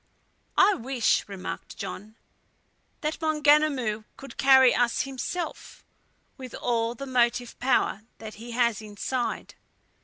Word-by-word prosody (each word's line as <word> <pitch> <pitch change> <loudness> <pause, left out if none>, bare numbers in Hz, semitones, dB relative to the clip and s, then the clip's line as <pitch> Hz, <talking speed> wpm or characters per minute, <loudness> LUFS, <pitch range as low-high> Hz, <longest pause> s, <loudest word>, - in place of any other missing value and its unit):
"I 400 +2 +6
wish," 250 - +1
remarked 195 -2 -7
John, 215 +3 -7 0.9
"that 305 +1 -3
Maunganamu 295 -8 +2
could 275 - -11
carry 265 -2 +6
us 240 0 +1
himself, 270 +6 -5 0.5
with 255 -3 -8
all 235 -1 -1
the 275 - -6
motive 245 -2 +1
power 245 -5 +1 0.2
that 220 -1 -9
he 240 - -9
has 235 -3 +1
inside. 215 +4 -3
245 Hz, 115 wpm, -26 LUFS, 230-275 Hz, 0.9 s, I